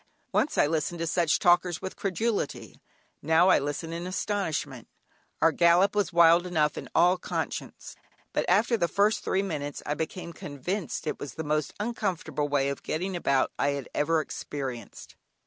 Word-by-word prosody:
Once 300 - +1
I - - +5
listened 160 +2 -1
to 165 - -2
such 165 -1 +2
talkers 175 -1 +3
with 190 - -6
credulity, 195 - -2 0.4
now 160 +4 +4
I - - +6
listen 145 +4 -4
in 170 +2 -4
astonishment. 160 - -3 0.6
Our 165 - +6
gallop 175 +5 +4
was 205 -5 +1
wild 170 +1 +5
enough 155 -4 +1
in - - -7
all 180 +2 +5
conscience, - - -5 0.4
but - - +1
after 235 - +3
the 170 -4 +1
first 205 +6 +2
three 190 +1 0
minutes 145 -6 -4
I 150 - -1
became 170 +3 -5
convinced 160 +8 -4
it 155 - -3
was 145 - -7
the 160 - -4
most 150 0 -1
uncomfortable 185 - -2
way 140 -1 +1
of 140 - -4
getting 185 +4 -3
about 140 -6 +1
I 145 - +2
had 140 - -7
ever 160 +2 +2
experienced. 130 -7 -7
165 Hz, 165 wpm, -27 LUFS, 145-185 Hz, 0.6 s, I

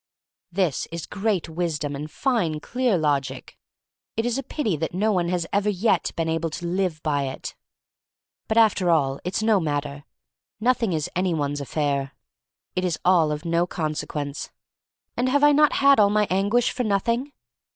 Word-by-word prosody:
This 175 -5 0
is 170 -1 -5
great 200 -4 -1
wisdom 160 -3 -2
and 150 +2 -6
fine, 180 - 0
clear 245 +3 0
logic. 140 -4 -1 0.6
It 225 - 0
is 240 +2 0
a - - -1
pity 250 - -2
that 160 +3 -3
no 215 +4 +2
one 175 -3 +1
has 175 -2 0
ever 205 +1 +2
yet 195 -2 +1
been 165 -1 -1
able 165 +1 -1
to 175 +3 -6
live 175 -2 -1
by 145 -3 0
it. 135 0 -6 0.9
But 220 - 0
after 210 -5 +4
all 140 -5 +2
it's 185 +4 -2
no 220 -2 +4
matter. 145 -3 -3 0.6
Nothing 235 -2 +1
is 155 -3 -1
any 180 -1 +1
one's 145 -1 -2
affair. 140 -1 -1 0.6
It 185 - 0
is 175 -3 0
all 170 -4 +4
of 150 +2 -4
no 170 +1 +1
con 155 -4 -2
sequence. 150 -1 -4 0.7
And 250 +1 +1
have 285 +2 +2
I 295 - +7
not 300 0 +4
had 280 -3 +5
all 205 -1 +6
my 210 0 +2
anguish 205 +6 +2
for 250 - -2
nothing? 230 +6 0
175 Hz, 175 wpm, -24 LUFS, 150-215 Hz, 0.9 s, I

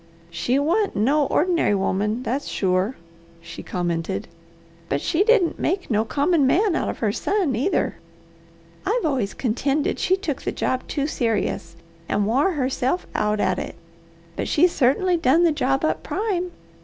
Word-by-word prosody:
"She 240 +10 0
wa'ant 345 +9 +1
no 275 +7 +2
ordinary 335 - +2
woman, 210 +4 -1
that's 265 +4 -2
sure," 190 +5 0 0.4
she 170 - -9
commented. 170 - -3 0.6
"And 140 - 0
she 330 - +1
didn't 430 -6 +3
make 370 -4 -1
no 215 0 +2
common 290 +3 +2
man 380 +5 +3
out - - -1
of - - -4
her 215 -3 0
son, 375 - 0
either. 280 - 0 0.9
I've 445 -1 0
always 255 -10 -1
contended 275 +5 0
she 375 - +2
took 330 -8 -3
the - - -2
job 255 0 -2
too 280 - -1
serious, 225 - -1 0.3
and 205 - +1
wore 275 - +2
herself 265 +3 -1
out 210 0 0
at 185 -2 +1
it, - - -6 0.6
but - - -3
she 310 - +4
certainly 345 +4 +2
done 325 +2 +3
the 335 - +4
work 270 -1 0
up - - 0
prime. 380 -4 -2
275 Hz, 155 wpm, -23 LUFS, 215-345 Hz, 0.9 s, she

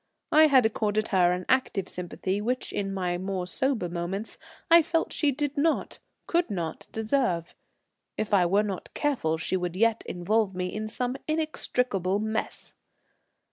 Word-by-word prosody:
I 310 +1 +7
had 265 -5 +5
accorded 215 -1 0
her 180 -4 +4
an 180 0 -2
active 230 -7 +1
sympathy 185 +2 -3
which 250 +4 -2
in 195 -1 -2
my 180 -2 -1
more 190 -1 -3
sober 250 0 0
moments 175 +5 -4 0.3
I 335 0 +8
felt 330 +1 -1
she 295 -2 +2
did 290 +1 -2
not, 315 +2 0 0.3
could 345 -3 +1
not, 170 -6 -4
deserve; 220 -7 0 0.6
if 215 -1 -2
I 180 -3 +5
were 200 +4 +3
not 195 -3 -5
careful 245 - 0
she 165 - -2
would 180 -1 -2
yet 230 +2 +2
involve 195 +2 0
me 180 0 -3
in 215 0 -3
some 250 +3 -3
inextricable 250 - 0
mess. 220 +1 -3
210 Hz, 155 wpm, -27 LUFS, 180-255 Hz, 0.6 s, I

